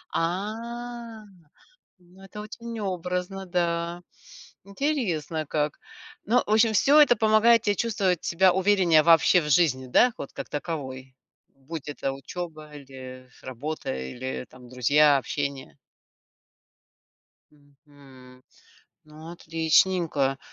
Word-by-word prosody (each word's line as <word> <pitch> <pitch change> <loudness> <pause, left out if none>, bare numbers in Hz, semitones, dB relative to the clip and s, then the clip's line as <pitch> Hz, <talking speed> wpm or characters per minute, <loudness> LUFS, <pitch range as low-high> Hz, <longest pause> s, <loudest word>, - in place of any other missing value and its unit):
А, 230 +5 -4 0.7
ну, 180 +2 -20
это 195 +2 -10
очень 230 +1 -8
образно, 180 0 -4
да. 170 -1 -2 0.6
Интересно 195 - -2
как. 150 0 -2 0.5
Ну, 245 +4 +3
в - - -6
общем, 220 +1 +4
всё 285 +8 +5
это 265 -6 +5
помогает 220 +1 +4
те 205 -2 +1
чувствовать 200 -6 -1
себя 185 +1 +3
увереннее 185 -5 +4
вообще 165 +2 +5
в 150 - -4
жизни, 135 -5 +2
да, 240 - +4
вот 140 - -7
как - - -7
таковой. 135 -4 -6 0.3
Будь 145 +2 -9
это 135 -2 -3
учёба 155 +2 -8
или 130 -2 -11
работа, 130 - -5
или 120 - -6
там 125 -1 -15
друзья, 140 +4 +4
общение. 140 - -5 1.8
Мгм. 140 -3 -19 0.6
Ну, 155 +2 -12
отличненько. 160 -4 +1
165 Hz, 110 wpm, -25 LUFS, 140-200 Hz, 1.8 s, всё